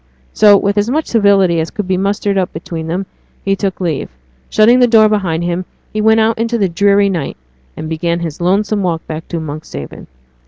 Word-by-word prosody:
So, 205 -1 +6
with 200 +1 0
as 205 +3 0
much 305 +5 0
civility 200 -6 +3
as 160 0 -2
could 210 -3 -5
be 190 - +1
mustered 200 +1 -1
up 185 -2 0
between 160 0 -6
them, 180 +4 -2 0.4
he 195 0 +2
took 195 -1 -3
leave. 165 -6 -2 0.4
Shutting 230 +4 +4
the 245 - +5
door 220 -2 +5
behind 185 -6 -1
him, 175 +1 -2 0.3
he 215 - -1
went 220 +1 +4
out 220 0 +1
into 230 +1 0
the 200 -3 +1
dreary 200 +3 +3
night, 170 -8 -3 0.4
and 155 - -5
began 170 +2 -2
his 165 -1 -5
lonesome 200 +4 +1
walk 170 -3 -2
back 160 0 -7
to 170 - -4
Monkshaven. 150 - -8
195 Hz, 200 wpm, -15 LUFS, 170-210 Hz, 0.4 s, So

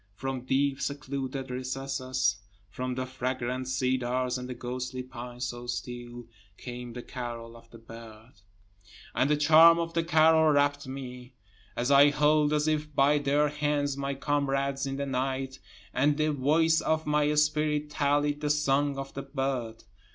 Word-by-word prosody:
>From 130 +1 -4
deep 135 +1 +1
secluded 135 -2 -4
recesses, 130 -3 -2 0.3
>From 125 +3 -4
the 130 0 -2
fragrant 130 0 -3
cedars 130 -1 0
and 125 0 -7
the 125 - -5
ghostly 125 +1 -5
pines 125 -1 -7
so 120 0 -6
still, 120 0 -6 0.3
Came 120 -1 -7
the 125 0 -7
carol 120 -2 -7
of 115 0 -16
the 115 - -13
bird. 115 0 -13 0.8
And 135 - +1
the 150 - +3
charm 160 +3 +7
of 165 0 -3
the 165 - +1
carol 160 -1 +5
rapt 145 0 +1
me, 125 -1 -8 0.4
As 125 +3 0
I 140 +1 +7
held 150 +1 +3
as 150 0 +1
if 155 -1 -1
by 145 +2 +4
their 145 +1 +2
hands 145 -1 -1
my 140 0 -3
comrades 140 -1 -1
in 135 - -3
the 140 +1 -3
night, 130 0 -2 0.3
And 145 +3 +2
the 155 0 +1
voice 160 +4 +3
of 160 0 0
my 150 0 +2
spirit 150 0 +1
tallied 145 +1 +1
the 150 - -1
song 145 -1 +1
of 135 0 -6
the 135 - -5
bird. 135 -5 -3
135 Hz, 160 wpm, -28 LUFS, 125-145 Hz, 0.8 s, charm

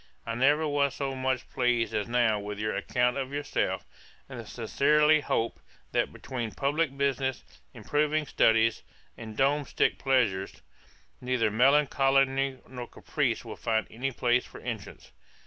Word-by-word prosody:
I 115 - -3
never 145 +6 +3
was 140 -1 +1
so 135 -1 -3
much 130 -1 -2
pleased 125 -2 +1
as 105 -2 -1
now 120 -3 +2
with 105 0 -6
your 105 +1 -2
account 125 +1 0
of 135 -1 -3
yourself; 145 +1 -2 0.4
and - - -8
sincerely 150 +2 +3
hope, 115 -4 -1 0.3
that - - 0
between 120 -4 -5
publick 145 0 0
business, 135 -2 0 0.3
improving 150 +1 0
studies, 115 -3 +3 0.3
and 110 -1 -9
domestick 140 +1 +1
pleasures, 110 - 0 0.6
neither 125 -4 +1
melancholy 135 +1 +3
nor 125 -2 -7
caprice - - -2
will - - -7
find 110 -1 0
any 130 +4 -3
place 120 0 +1
for - - -12
entrance. - - -7
130 Hz, 135 wpm, -28 LUFS, 115-140 Hz, 0.6 s, never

